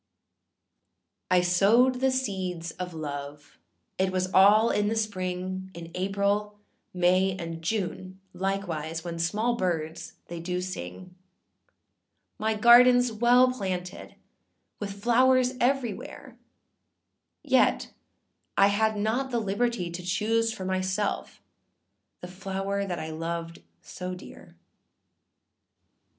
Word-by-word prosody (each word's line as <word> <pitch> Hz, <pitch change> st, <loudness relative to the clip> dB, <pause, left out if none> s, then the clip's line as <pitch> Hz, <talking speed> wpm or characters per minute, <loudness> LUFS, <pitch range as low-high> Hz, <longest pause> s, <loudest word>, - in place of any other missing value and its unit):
] -, -, -54 dB
I -, -, +5 dB
SOWED 215 Hz, +9 st, +3 dB
the 265 Hz, +1 st, +3 dB
seeds 190 Hz, -10 st, -3 dB
of 180 Hz, -1 st, -7 dB
love, 145 Hz, -1 st, -7 dB, 0.4 s
it 190 Hz, 0 st, +1 dB
was 185 Hz, 0 st, -2 dB
all 210 Hz, +4 st, +6 dB
in 205 Hz, 0 st, +1 dB
the 220 Hz, -, 0 dB
spring, 185 Hz, -3 st, -3 dB
In 170 Hz, 0 st, -9 dB
April, 200 Hz, +2 st, -1 dB, 0.3 s
May, 185 Hz, +1 st, +2 dB
and 165 Hz, -2 st, -6 dB
June, 185 Hz, 0 st, -3 dB
likewise, 175 Hz, -4 st, -3 dB
when 170 Hz, -1 st, -5 dB
small 210 Hz, +8 st, 0 dB
birds 165 Hz, -5 st, -3 dB
they 170 Hz, 0 st, -7 dB
do 180 Hz, +2 st, -3 dB
sing; 180 Hz, -, -7 dB, 1.3 s
My 220 Hz, 0 st, 0 dB
gardenâs 245 Hz, +2 st, +6 dB
well 245 Hz, +2 st, +5 dB
planted 185 Hz, -6 st, -5 dB, 0.6 s
with 200 Hz, -1 st, -6 dB
flowers 255 Hz, +1 st, +4 dB
everywhere, 245 Hz, -4 st, -2 dB, 1.1 s
Yet -, -, +2 dB, 0.6 s
I 200 Hz, 0 st, +6 dB
had 220 Hz, +1 st, +1 dB
not 225 Hz, +6 st, -1 dB
the 240 Hz, -, -1 dB
liberty 215 Hz, -3 st, -1 dB
to 170 Hz, +1 st, -6 dB
choose 220 Hz, +6 st, 0 dB
for 190 Hz, -4 st, -6 dB
myself 190 Hz, +2 st, -2 dB, 0.8 s
the 180 Hz, -, -7 dB
flower 195 Hz, +1 st, -3 dB
that 175 Hz, -2 st, -3 dB
I 160 Hz, 0 st, -5 dB
loved 165 Hz, +1 st, -5 dB, 0.2 s
so 180 Hz, 0 st, -6 dB
dear. 180 Hz, -, -13 dB
190 Hz, 110 wpm, -27 LUFS, 180-220 Hz, 1.3 s, all